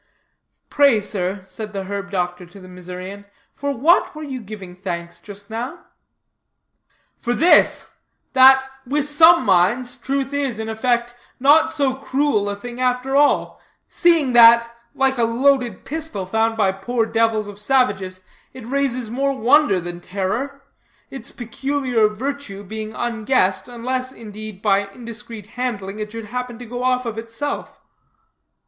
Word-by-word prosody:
"Pray, 280 -6 +5
sir," 195 -1 -3
said 210 +3 -8
the 195 -1 -3
herb 200 +1 -5
doctor 180 -2 -2
to 180 +4 -14
the 185 - -13
Missourian, 185 +2 -8 0.3
"for 285 +1 -3
what 300 +8 +3
were 310 - -7
you 265 -4 -5
giving 195 -4 -9
thanks 170 -2 -6
just 205 +1 -11
now?" 235 +4 -5 1.3
"For 240 0 -1
this: 345 +3 +4 0.4
that, 265 0 +7 0.2
with 280 +3 -1
some 320 +3 +6
minds, 205 +7 +2
truth 275 0 -3
is, 275 -5 -1
in 220 0 -4
effect, 240 +1 0 0.3
not 295 +5 +5
so 280 -4 +1
cruel 265 -5 0
a 200 - -3
thing 240 +4 -9
after 255 +1 0
all, 290 +1 +2 0.3
seeing 330 -7 +2
that, 235 0 +7 0.2
like 265 -1 +1
a - - +3
loaded 245 -2 +1
pistol 315 -10 -4
found 225 +3 0
by 200 -3 +3
poor 225 +5 -1
devils 225 -1 +1
of 205 0 -10
savages, 200 -7 0 0.3
it 255 -3 -10
raises 255 -3 -1
more 275 +2 0
wonder 255 -4 +4
than 175 0 -7
terror 210 +10 -3 0.5
its 270 - -6
peculiar 250 -1 0
virtue 220 -2 -5
being 215 +2 -6
unguessed, 225 -4 0
unless, 255 +2 -3
indeed, 215 -4 -10
by 200 -1 +2
indiscreet 230 0 -10
handling, 215 -4 -4
it 210 0 -5
should 225 -1 -7
happen 250 +1 -5
to 245 - -9
go 245 +2 -6
off 255 0 +1
of 225 -1 -4
itself." 230 +6 -5
235 Hz, 145 wpm, -21 LUFS, 205-265 Hz, 1.3 s, that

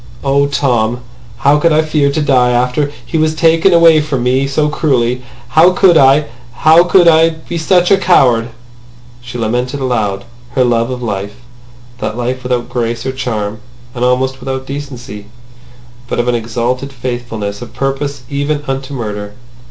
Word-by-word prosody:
"Oh, 140 +1 +2
Tom! 125 -4 0 0.4
How 145 +1 +5
could 165 +2 +2
I 155 +1 +3
fear 150 -2 +1
to 150 +2 -1
die 130 -4 +3
after 125 +4 0
he 160 - -2
was 155 0 +1
taken 165 +3 +3
away 165 -2 +6
from 140 -5 -2
me 130 +2 +1
so 150 +2 0
cruelly! 125 -5 0 0.3
How 165 +7 +5
could 180 -1 +4
I! 140 0 +5 0.4
How 160 +2 +7
could 175 -1 +4
I 165 0 +5
be 165 +1 -7
such 175 +3 +2
a 195 - +5
coward!" 125 -11 +3 0.7
She 125 0 -8
lamented 125 +4 -2
aloud 110 -7 -2 0.3
her 130 - +3
love 120 -1 +1
of 125 -1 -5
life, 100 -2 -4 0.6
that 110 - -4
life 125 +1 -3
without 125 -1 -2
grace 115 -1 -3
or 130 - -1
charm, 110 -5 -4 0.3
and 125 - -4
almost 130 +1 0
without 130 0 -5
decency, 125 -7 -8 0.8
but - - -3
of 120 - 0
an 125 - +2
exalted 120 +4 -2
faithfulness 120 -5 -5
of 120 -2 -9
purpose, 135 +1 -3
even 145 +1 -2
unto 135 +1 -4
murder. 105 -3 -5
130 Hz, 165 wpm, -14 LUFS, 120-150 Hz, 0.8 s, How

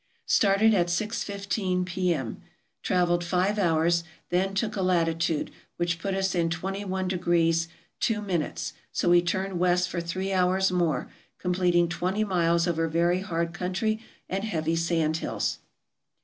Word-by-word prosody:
Started 205 +2 +4
at 175 -3 +2
six 215 +6 -1
fifteen 195 -2 -1
P.M. 175 -9 -1 0.4
Traveled 175 -1 +1
five 185 +4 +1
hours; 170 -1 +2 0.3
then 190 +2 +1
took 215 +1 -1
a 195 - -1
latitude, 165 -3 +1 0.3
which 175 -1 -1
put 195 +2 -2
us 190 0 0
in 170 -2 +1
21° 180 -2 0 0.3
2'; 205 -8 -1 0.2
so - - 0
we 175 0 +6
turned 190 +1 -2
west 180 0 +2
for 170 - -2
three 185 +3 -3
hours 185 +1 +2
more, 175 -3 0 0.3
completing 180 -1 +2
twenty 185 +5 -1
miles 170 -3 +2
over 165 -1 +1
very 170 +3 +2
hard 170 -2 -2
country 190 +5 -1 0.3
and 195 +1 -2
heavy 165 -6 -1
sand 165 -1 +1
hills. - - -2
180 Hz, 135 wpm, -27 LUFS, 170-190 Hz, 0.4 s, we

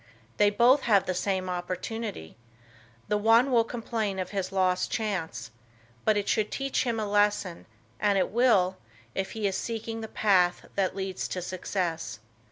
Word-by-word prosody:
They 205 - +5
both 245 +6 +4
have 200 -3 +5
the 185 - -1
same 185 0 -1
opportunity. 180 - -4 0.7
The 210 0 +1
one 230 +5 +4
will 235 -2 +5
complain 225 -4 -3
of 185 - -4
his 195 -2 -2
lost 185 -1 +1
chance. 160 - -3 0.5
But 215 -1 +4
it 205 - -1
should 215 -2 +1
teach 275 -1 -1
him 230 -2 -1
a 215 - -1
lesson, 205 -3 +1 0.3
and 205 -1 +2
it 185 - +1
will, 205 -6 +3 0.4
if 190 0 -3
he 220 -2 -3
is 195 -1 +1
seeking 225 0 -4
the 220 - -5
path 185 -5 +2
that 190 -1 0
leads 190 -1 -3
to 180 - -4
success. 180 - -3
200 Hz, 165 wpm, -28 LUFS, 185-225 Hz, 0.7 s, They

